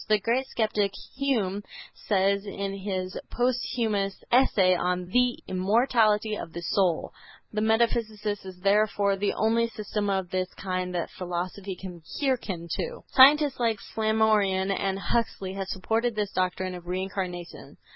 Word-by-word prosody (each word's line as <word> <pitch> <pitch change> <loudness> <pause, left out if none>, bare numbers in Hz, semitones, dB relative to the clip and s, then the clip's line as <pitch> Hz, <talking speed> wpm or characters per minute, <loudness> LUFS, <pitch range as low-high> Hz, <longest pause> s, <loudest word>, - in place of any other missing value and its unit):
The 215 - +4
great 240 +6 0
skeptic 210 -4 0 0.2
Hume 225 -8 0 0.5
says 200 0 +2
in 200 0 -3
his 185 -2 -3
posthumous 230 -5 -1
essay 205 -7 +5
on 180 0 0
"The 250 +3 +2
Immortality 215 +2 +2
of 165 - -7
the 170 - -6
Soul," 180 -2 +1 0.4
"The 215 - 0
metempsychosis 220 -2 +1
is 185 -1 -10
therefore 200 0 +3
the 200 +1 0
only 230 +1 +2
system 210 -2 -3
of 190 -2 -1
this 185 0 -1
kind 185 -1 -3
that 170 - -2
philosophy 185 +2 -4
can 180 -2 -9 0.2
hearken 230 - -1
to." 485 0 -4
Scientists 280 +1 +6
like 230 -2 +1 0.2
Flammarion 215 -3 +2
and 195 0 -1
Huxley 195 -1 -1
have 195 -1 -4
supported 225 +5 -1
this 205 -1 -1
doctrine 185 0 -1
of 175 -1 -9
Reincarnation. 180 -1 -5
200 Hz, 135 wpm, -27 LUFS, 185-225 Hz, 0.5 s, Scientists